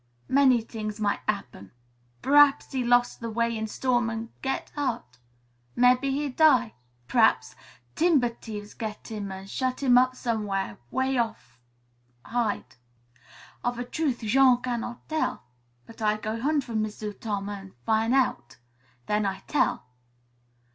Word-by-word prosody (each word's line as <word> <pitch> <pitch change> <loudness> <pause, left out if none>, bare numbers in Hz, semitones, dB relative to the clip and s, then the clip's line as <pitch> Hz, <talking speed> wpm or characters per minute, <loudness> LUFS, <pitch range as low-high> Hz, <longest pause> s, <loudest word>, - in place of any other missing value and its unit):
"Many 260 -4 +4
t'ings 215 -2 -6
might 205 -1 0
'appen. 120 - -4 0.5
P'r'aps 290 0 +5
he 260 -2 -1
lose 245 0 +3
the 230 - -5
way 230 +1 0
in 220 0 -3
storm 240 +1 0
an' 225 0 -5
get 270 0 -3
hurt; 235 - -4 0.6
mebbe 250 +1 +5
he 280 +2 0
die. 255 -5 +4 0.3
P'r'aps 220 - +3 0.4
timber 310 -7 +3
t'ieves 210 -3 -9
get 215 -2 -6
him 205 -3 -4
an' 190 0 -7
shut 255 +6 -2
him 250 -2 +6
up 255 0 +2
somew'ere 210 - -2
way 260 - 0
off 220 - -4 0.7
hid. 235 - -2 0.9
Of 245 0 -1
a 245 - -3
truth, 270 -1 -2
Jean 250 +3 +4
cannot 240 -1 -4
tell. 315 0 -1 0.4
But 225 0 -14
I 215 0 +2
go 215 +2 -4
hunt 290 +1 +1
for 240 - -8
M'sieu' 215 -1 -3
Tom 200 -1 -4
an' 195 -2 -8
fin' 220 - +2
out. 135 - 0 0.5
Then 210 +3 +1
I 195 0 -4
tell." 245 -4 0
235 Hz, 140 wpm, -27 LUFS, 215-255 Hz, 0.9 s, him